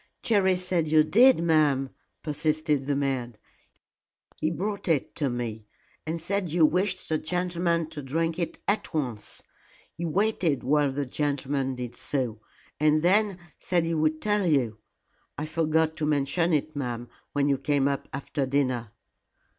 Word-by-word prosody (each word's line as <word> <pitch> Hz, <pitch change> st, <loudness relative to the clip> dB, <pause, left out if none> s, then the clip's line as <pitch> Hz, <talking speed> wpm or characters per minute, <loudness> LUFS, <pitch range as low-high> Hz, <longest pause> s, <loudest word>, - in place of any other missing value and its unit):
"Jerry 195 Hz, -5 st, +3 dB
said 180 Hz, -3 st, 0 dB
you 155 Hz, 0 st, +5 dB
did, 235 Hz, +3 st, +5 dB
ma'am," 150 Hz, -5 st, +3 dB, 0.3 s
persisted 150 Hz, -2 st, 0 dB
the 145 Hz, -, +1 dB
maid; 130 Hz, -5 st, -2 dB, 1.0 s
"he 155 Hz, -, 0 dB
brought 200 Hz, +5 st, -3 dB
it 160 Hz, -5 st, +1 dB
to 145 Hz, -4 st, 0 dB
me, 115 Hz, -3 st, -4 dB, 0.4 s
and 165 Hz, +1 st, -2 dB
said 185 Hz, +2 st, -1 dB
you 165 Hz, 0 st, +4 dB
wished 185 Hz, +4 st, 0 dB
the 155 Hz, -1 st, 0 dB
gentleman 170 Hz, -1 st, 0 dB
to 150 Hz, -2 st, -6 dB
drink 165 Hz, +5 st, -1 dB
it 170 Hz, -, -2 dB
at 205 Hz, -4 st, -1 dB
once. 125 Hz, -8 st, -3 dB, 0.5 s
He 170 Hz, -, -4 dB
waited 175 Hz, -4 st, +1 dB
while 145 Hz, +1 st, +2 dB
the 140 Hz, +1 st, -2 dB
gentleman 135 Hz, -1 st, -1 dB
did 125 Hz, -1 st, -6 dB
so, 120 Hz, -6 st, -2 dB, 0.4 s
and 155 Hz, +1 st, +3 dB
then 200 Hz, +1 st, +3 dB, 0.2 s
said 175 Hz, -2 st, +1 dB
he 165 Hz, -, -1 dB
would 155 Hz, 0 st, 0 dB
tell 210 Hz, -3 st, +2 dB
you. 125 Hz, -9 st, +1 dB, 0.6 s
I 150 Hz, -, -2 dB
forgot 160 Hz, 0 st, +1 dB
to 150 Hz, -, -1 dB
mention 150 Hz, +4 st, +1 dB
it, 155 Hz, 0 st, 0 dB
ma'am, 120 Hz, -4 st, -3 dB, 0.3 s
when 145 Hz, -1 st, +2 dB
you 140 Hz, -2 st, +2 dB
came 140 Hz, 0 st, +1 dB
up 140 Hz, -1 st, -2 dB
after 140 Hz, 0 st, -3 dB
dinner." 130 Hz, -5 st, 0 dB
155 Hz, 155 wpm, -27 LUFS, 135-170 Hz, 1.0 s, you